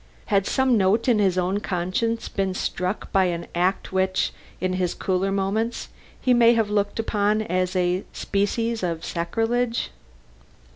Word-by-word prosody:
Had 195 -1 +3
some 260 -3 +3
note 205 +4 +2
in 235 -4 +4
his 190 -3 +2
own 185 +2 +1
conscience 195 +5 -1
been 195 -2 -2
struck 185 +1 -3
by 190 -1 +4
an 170 -1 -2
act 180 +2 0
which, 190 0 +1 0.3
in 185 0 -1
his 180 -1 -1
cooler 190 +1 0
moments, 200 +4 -1 0.3
he 255 - +3
may 235 -1 +6
have 220 -2 +1
looked 205 -1 0
upon 215 -1 +1
as 185 -1 -1
a 180 +1 +1
species 225 +3 -1
of 170 -3 -2
sacrilege? 225 +7 -1
195 Hz, 150 wpm, -24 LUFS, 185-225 Hz, 0.3 s, may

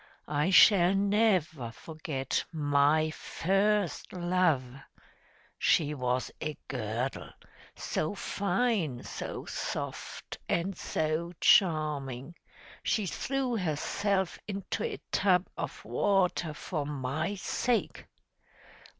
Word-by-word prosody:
I 150 +3 +1
shall 190 -1 +7
never 195 - +2
forget 150 0 -3
MY 150 0 +3
FIRST 195 +3 0
LOVE 175 -5 +2 1.0
she 150 -2 +3
was 125 -2 -1
a 155 -2 -3
girdle, 120 +1 -3 0.5
so 155 +6 -2
fine, 195 - 0
so - - -6
soft, - - -5
and 180 +3 0
so 160 +1 -2
charming, 150 -5 +3 0.5
she 215 -3 0
threw 260 +6 -1
herself 190 +3 -1
into 200 -2 -3
a - - -3
tub 185 -2 +3
of - - -5
water 180 -5 +1
for 155 -2 -3
my 145 +6 -2
sake! 235 +4 -1
170 Hz, 90 wpm, -30 LUFS, 145-195 Hz, 1.0 s, shall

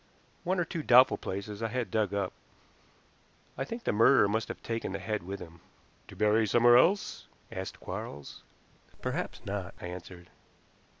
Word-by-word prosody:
"One 185 +1 0
or 175 - +1
two 165 0 -4
doubtful 125 -2 +6
places 100 +2 -5
I 115 - 0
had 120 +1 -3
dug 110 -3 +1
up. 100 -2 -2 1.2
I - - -2
think 230 - -6
the - - +1
murderer 115 +1 +5
must 110 +2 -1
have - - -8
taken 115 -4 -3
the - - -1
head 105 +2 -3
with 95 +3 -6
him." 85 -1 -11 0.5
"To - - -12
bury 105 +2 +3
somewhere 120 +3 +6
else?" 185 +11 +3 0.2
asked 95 0 -6
Quarles. 70 0 -7 0.6
"Perhaps - - -3
not," 100 -2 -4
I - - -7
answered. 90 0 -9
105 Hz, 165 wpm, -30 LUFS, 95-120 Hz, 1.2 s, doubtful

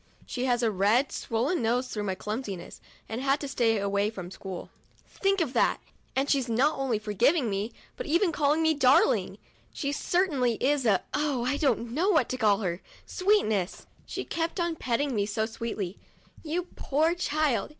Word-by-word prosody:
She 250 0 -3
has 245 -1 +1
a 225 - +3
red, 210 +8 +2
swollen 255 +9 -1
nose 245 +3 +1
through 210 -1 -3
my 190 -2 -1
clumsiness, 210 -3 -5 0.3
and 225 +3 -4
has 270 - -2
had 285 - -1
to 285 - -3
stay 235 -5 +2
away 200 +1 +1
from 185 -5 -8
school. 190 -2 -7 0.3
Think 390 -1 0
of 280 -6 -1
that! - - +2 0.4
And 270 +1 +1
she's 270 -4 +1
not 265 +6 +2
only 260 -5 +1
forgiven 215 - +2
me, 200 +4 -2 0.2
but - - -6
even 340 +4 +3
called 295 -1 +2
me 320 0 +3
darling! 290 +8 +3 0.3
She 280 -2 -3
cer 355 +5 +1
tainly 250 - 0
is 275 -1 +2
a 195 -4 +3
— - - -41
oh! 285 -5 0
I 280 +3 +1
don't 240 -6 0
know 335 - +1
what 315 - +3
to 255 - -2
call 210 -4 +3
her 175 -2 -2 0.2
— - - -26
sweetness! 220 - +1 0.2
She - - -4
kept 335 +2 -2
on 340 -1 0
petting 265 0 -1
me 205 -2 0
so 220 +1 0
sweetly. 220 -4 -5 0.2
" - - -25
You 340 +3 -3
poor 310 +4 +1
child 310 -6 0
255 Hz, 195 wpm, -28 LUFS, 215-305 Hz, 0.4 s, a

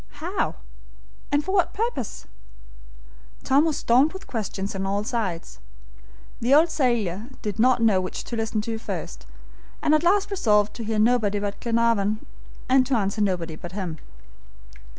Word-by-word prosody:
how? 345 +7 -2 0.8
and 290 +1 +1
for 380 - -2
what 380 -3 +2
purpose? 420 - -3 1.2
Tom 280 +4 +4
was 315 -3 0
stormed 260 +8 +3
with 380 - -9
questions 205 -3 -4
on 195 -1 -3
all 200 +1 -1
sides. 190 - -3 0.8
The 250 +4 +4
old 320 +2 +5
sailor 230 - 0 0.2
did 210 -1 -4
not 245 0 +4
know 200 -5 +4
which 185 - -5
to 235 - -5
listen 220 -1 -1
to 225 +1 -4
first, - - -6 0.5
and 300 - +2
at 310 - +4
last 390 +4 +2
resolved 210 - +2
to 235 - -5
hear 220 0 -2
nobody 215 -2 +3
but 205 0 -3
Glenarvan, 230 -3 +1 0.4
and 260 0 +5
to 265 - +1
answer 200 0 -1
nobody 175 -5 -1
but 175 +3 -9
him. 180 -6 -4
225 Hz, 155 wpm, -24 LUFS, 200-270 Hz, 1.2 s, old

